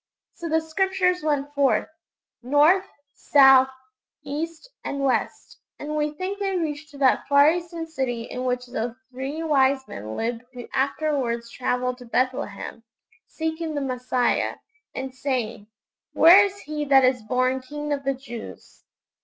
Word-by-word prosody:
So 335 - -6
the 320 +1 +2
Scriptures 365 +2 0
went 290 -2 -1
forth, 275 -6 +2 0.5
north, 295 +9 +4 0.3
south, 270 -2 +6 0.5
east, 315 - -5 0.2
and 280 - -3
west, 265 -2 -1 0.2
and 300 +1 -5
we 300 0 +1
think 370 +6 -5
they 390 -2 -1
reached 310 -2 -3
to 290 - -13
that 270 -2 +2
far 285 +2 +6
eastern 340 -1 -4
city 260 -7 -3
in 250 +2 -6
which 250 0 -1
those 240 -1 -4 0.2
three 270 +5 -4
wise 270 -3 +2
men 110 +2 -7
lived 230 0 -2
who 245 -2 -8
afterwards 265 -4 -1
travelled 250 0 -2
to 245 - -11
Bethlehem, 240 -3 -2 0.5
seeking 320 0 -3
the - - 0
Messiah, 250 -2 0 0.4
and 265 0 -5
saying, 250 -6 -3 0.5
'_Where 380 +5 +8
is 395 0 -10
He 300 0 -4
that 270 -2 +6
is 255 -2 +2
born 255 +4 0
King 295 +3 -4
of 280 -1 -3
the 275 0 0
Jews? 240 -4 -10
275 Hz, 145 wpm, -24 LUFS, 250-315 Hz, 0.5 s, Where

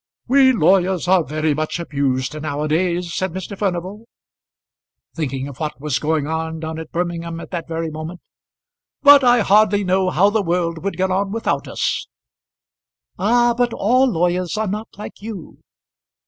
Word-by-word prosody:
"We 265 +1 +5
lawyers 185 -3 +2
are 185 -2 +4
very 155 +1 -1
much 155 +3 -3
abused 140 -2 -2
now 145 -1 -3
a - - -1
days," 170 +2 0
said 185 -2 -2
Mr. 190 +2 -6
Furnival, 195 +3 -3 1.1
thinking 135 -4 -3
of 140 -3 -10
what 155 -2 -4
was 150 -2 -1
going 155 -1 0
on 160 +1 -3
down 160 0 -5
at 160 - -9
Birmingham 170 -1 -3
at - - -10
that 170 -3 -4
very 165 -1 -3
moment; 155 +3 -7 0.8
"but 285 -1 +8
I 245 -1 +5
hardly 205 0 +4
know 185 0 +1
how 200 +3 +3
the 220 0 +1
world 170 -2 -1
would 200 - -3
get 190 0 0
on 195 +1 0
without 210 -10 -2
us." - - -2 1.1
"Ah! 240 +4 +3
but 245 -1 0
all 255 +6 +3
lawyers 180 0 0
are 220 - 0
not 210 +3 -4
like 210 - -9
you." 210 -6 -8
180 Hz, 165 wpm, -20 LUFS, 160-205 Hz, 1.1 s, but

